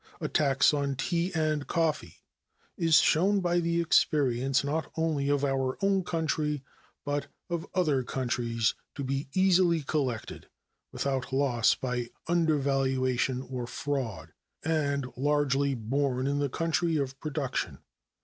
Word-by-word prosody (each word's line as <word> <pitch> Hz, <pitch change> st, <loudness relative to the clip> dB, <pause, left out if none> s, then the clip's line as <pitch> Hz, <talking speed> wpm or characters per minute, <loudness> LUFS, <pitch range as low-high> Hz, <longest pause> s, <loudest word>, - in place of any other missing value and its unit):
A -, -, -2 dB
tax 135 Hz, -2 st, +3 dB
on 140 Hz, -2 st, 0 dB
tea 170 Hz, +6 st, -1 dB
and 155 Hz, -2 st, 0 dB
coffee 155 Hz, -, -1 dB, 0.5 s
is 165 Hz, -2 st, +3 dB
shown 190 Hz, +7 st, +4 dB
by 175 Hz, -1 st, +1 dB
the 170 Hz, 0 st, 0 dB
experience 135 Hz, -5 st, +2 dB
not 155 Hz, +3 st, -2 dB
only 155 Hz, -4 st, 0 dB
of 145 Hz, 0 st, +2 dB
our 135 Hz, -1 st, 0 dB
own 195 Hz, -1 st, +2 dB
country, 155 Hz, -4 st, -1 dB, 0.4 s
but 145 Hz, 0 st, -2 dB, 0.2 s
of 170 Hz, -1 st, -2 dB
other 155 Hz, -8 st, +2 dB
countries, 120 Hz, -3 st, -1 dB, 0.2 s
to 140 Hz, -, -4 dB
be 135 Hz, +1 st, -2 dB
easily 180 Hz, -4 st, +4 dB
collected, 135 Hz, -6 st, -3 dB, 0.4 s
without 135 Hz, -2 st, -2 dB
loss 130 Hz, -4 st, +3 dB
by 125 Hz, -2 st, -3 dB, 0.2 s
undervaluation 135 Hz, -6 st, +1 dB
or 125 Hz, -2 st, -5 dB
fraud, 120 Hz, -, -4 dB, 0.3 s
and 140 Hz, -4 st, 0 dB
largely 140 Hz, 0 st, +1 dB
borne 130 Hz, +3 st, -1 dB
in 140 Hz, +1 st, 0 dB
the 145 Hz, -1 st, 0 dB
country 165 Hz, +2 st, 0 dB
of 135 Hz, -1 st, -3 dB
production. 145 Hz, -4 st, -3 dB
140 Hz, 130 wpm, -29 LUFS, 130-160 Hz, 0.5 s, shown